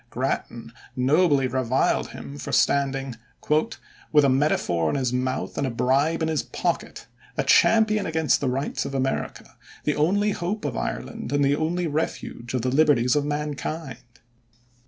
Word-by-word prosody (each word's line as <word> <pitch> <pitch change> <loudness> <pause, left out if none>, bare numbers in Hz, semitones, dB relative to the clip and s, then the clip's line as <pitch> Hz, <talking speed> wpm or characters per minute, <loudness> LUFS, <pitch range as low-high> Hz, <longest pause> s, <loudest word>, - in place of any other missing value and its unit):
Grattan 115 0 -3 0.2
nobly 140 +2 +3
reviled 130 0 +1
him 70 0 -9
for - - -6
standing 135 -3 +1 0.9
"with 150 -2 +5
a - - +4
metaphor 110 - +1
in - - -1
his 130 -3 -1
mouth 130 +1 -2
and 140 - 0
a - - -1
bribe 140 +7 +1
in - - +1
his 160 -2 0
pocket, - - -3 0.3
a - - +1
champion 215 -2 +4
against 160 -1 +1
the 135 - 0
rights 135 +3 -2
of 135 - -5
America, 135 0 -3 0.3
the 150 - 0
only 200 +7 +2
hope 195 +1 -3
of 135 -5 -2
Ireland - - -4
and 145 0 +2
the 140 +1 +3
only 170 +3 -1
refuge 145 -5 -3
of 125 - -1
the 130 - +1
liberties 135 -4 +3
of 145 -1 +1
mankind." 150 -2 -4
140 Hz, 155 wpm, -24 LUFS, 130-155 Hz, 0.9 s, with